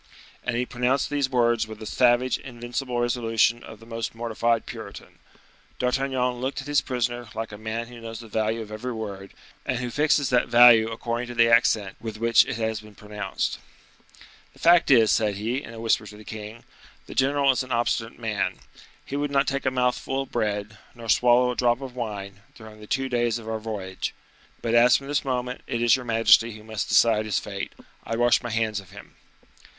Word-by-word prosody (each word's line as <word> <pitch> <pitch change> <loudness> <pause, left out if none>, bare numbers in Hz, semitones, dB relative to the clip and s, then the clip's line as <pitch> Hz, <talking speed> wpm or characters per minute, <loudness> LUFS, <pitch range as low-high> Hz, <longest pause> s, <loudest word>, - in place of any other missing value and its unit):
And 125 - -2
he 125 +1 0
pronounced 125 +3 0
these 140 -2 0
words 120 -3 +2
with 110 -1 -9
the 110 - -9
savage, 125 +3 +2
invincible 120 0 -4
resolution 120 -1 +1
of 110 - -11
the 115 - -15
most 115 0 -5
mortified 115 0 0
Puritan. - - -10 0.6
D'Artagnan 125 -1 0
looked 130 +2 -2
at - - -7
his 145 0 +2
prisoner 120 -2 -3
like 115 0 -4
a - - -7
man 110 +2 -3
who 120 0 -12
knows 115 -1 -7
the 115 - -10
value 110 +1 -1
of 105 -1 -9
every 120 +4 -4
word, 100 -3 -7 0.3
and 130 -3 -1
who 125 0 -4
fixes 145 -2 +2
that 125 - +3
value 120 -2 +7
according 115 +1 -3
to 120 - -7
the 115 0 +5
accent 105 -4 +3
with 110 -2 -6
which 115 +1 +5
it - - -4
has 110 -1 -2
been 105 -1 -15
pronounced. 105 -2 -4 0.9
"The - - -21
fact 170 0 +5
is," 115 -5 +6
said 105 -2 +1
he, 115 +7 -2
in - - -10
a 115 - -9
whisper 115 -1 +1
to 105 - -11
the 105 - -13
king, 110 +1 -8 0.4
"the - - -9
general 140 +1 +3
is 130 - 0
an 130 0 -7
obstinate 115 -1 -1
man; 110 -3 -2 0.5
he 140 - -6
would 145 0 -1
not 140 -1 +2
take 140 0 -1
a - - +5
mouthful 130 +1 -1
of - - -16
bread, 105 -2 -2 0.2
nor 115 -1 -9
swallow 125 +2 +4
a - - -5
drop 120 0 +2
of 130 -2 -8
wine, 100 -4 -6
during 110 -1 -13
the 105 - -12
two 135 +2 0
days 120 -2 0
of 115 -1 -10
our 110 0 -2
voyage. 100 -4 -5 0.5
But 115 - -1
as 120 +1 +6
from 135 - -10
this 145 +1 -1
moment 125 -1 -3
it 115 - -2
is 120 0 +5
your 125 -1 -6
majesty 115 0 +4
who 110 0 -12
must 110 -1 -4
decide 110 -1 +4
his 105 -3 0
fate, 100 -1 -5 0.3
I 115 - -3
wash 120 +1 +3
my 120 - -5
hands 110 -2 -1
of 95 -3 -14
him." 100 +1 -13
115 Hz, 205 wpm, -25 LUFS, 110-125 Hz, 0.9 s, value